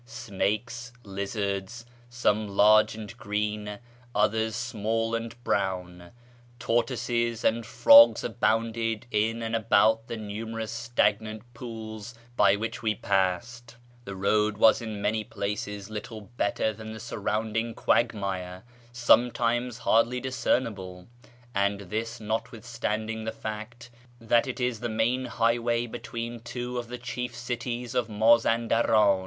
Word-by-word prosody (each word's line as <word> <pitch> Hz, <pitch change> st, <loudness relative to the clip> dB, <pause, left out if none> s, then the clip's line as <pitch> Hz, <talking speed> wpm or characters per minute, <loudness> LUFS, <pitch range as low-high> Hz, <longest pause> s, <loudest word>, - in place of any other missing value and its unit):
Snakes, 120 Hz, +2 st, -3 dB
lizards 100 Hz, +2 st, -4 dB, 0.2 s
(some 110 Hz, -3 st, +1 dB
large 105 Hz, +2 st, +5 dB
and 105 Hz, -3 st, -8 dB
green, 105 Hz, 0 st, -2 dB, 0.4 s
others 110 Hz, +1 st, +1 dB
small 115 Hz, 0 st, -1 dB
and 115 Hz, 0 st, -3 dB
brown), 90 Hz, -4 st, -2 dB, 0.5 s
tortoises, 120 Hz, -1 st, 0 dB
and 115 Hz, 0 st, +1 dB
frogs 285 Hz, -, +8 dB
abounded 115 Hz, -1 st, 0 dB
in 110 Hz, +2 st, 0 dB
and 115 Hz, 0 st, -2 dB
about 110 Hz, 0 st, +3 dB
the 115 Hz, -, -4 dB
numerous 110 Hz, +1 st, -5 dB
stagnant 110 Hz, -2 st, 0 dB
pools 110 Hz, -1 st, -8 dB, 0.2 s
by 100 Hz, -3 st, +5 dB
which 110 Hz, +3 st, -4 dB
we 110 Hz, -2 st, 0 dB
passed. 115 Hz, +6 st, -1 dB, 0.3 s
The 100 Hz, -3 st, -7 dB
road 105 Hz, +2 st, +1 dB
was 110 Hz, +2 st, +5 dB
in 110 Hz, -3 st, -5 dB
many 110 Hz, +1 st, 0 dB
places 105 Hz, 0 st, -4 dB
little 110 Hz, +1 st, -6 dB
better 110 Hz, 0 st, 0 dB
than 110 Hz, +1 st, -8 dB
the 110 Hz, -, -8 dB
surrounding 115 Hz, 0 st, -2 dB
quagmire, 95 Hz, -5 st, 0 dB, 0.3 s
sometimes 120 Hz, 0 st, +2 dB
hardly 120 Hz, +1 st, +2 dB
discernible; 105 Hz, -8 st, -2 dB, 0.5 s
and 100 Hz, 0 st, +1 dB
this 110 Hz, +4 st, -4 dB
notwithstanding 110 Hz, 0 st, -3 dB
the 110 Hz, -, -2 dB
fact 110 Hz, +3 st, -7 dB, 0.3 s
that 115 Hz, +2 st, +2 dB
it 130 Hz, -, -4 dB
is 125 Hz, -3 st, -1 dB
the 120 Hz, -, -3 dB
main 115 Hz, +4 st, 0 dB
highway 120 Hz, 0 st, +1 dB
between 115 Hz, 0 st, -6 dB
two 120 Hz, +1 st, -4 dB
of 120 Hz, -, -6 dB
the 125 Hz, +1 st, -6 dB
chief 125 Hz, 0 st, -5 dB
cities 120 Hz, 0 st, -4 dB
of 125 Hz, -3 st, 0 dB
Mazau 115 Hz, +2 st, +3 dB
daran. 110 Hz, -4 st, +4 dB
110 Hz, 125 wpm, -27 LUFS, 105-120 Hz, 0.5 s, frogs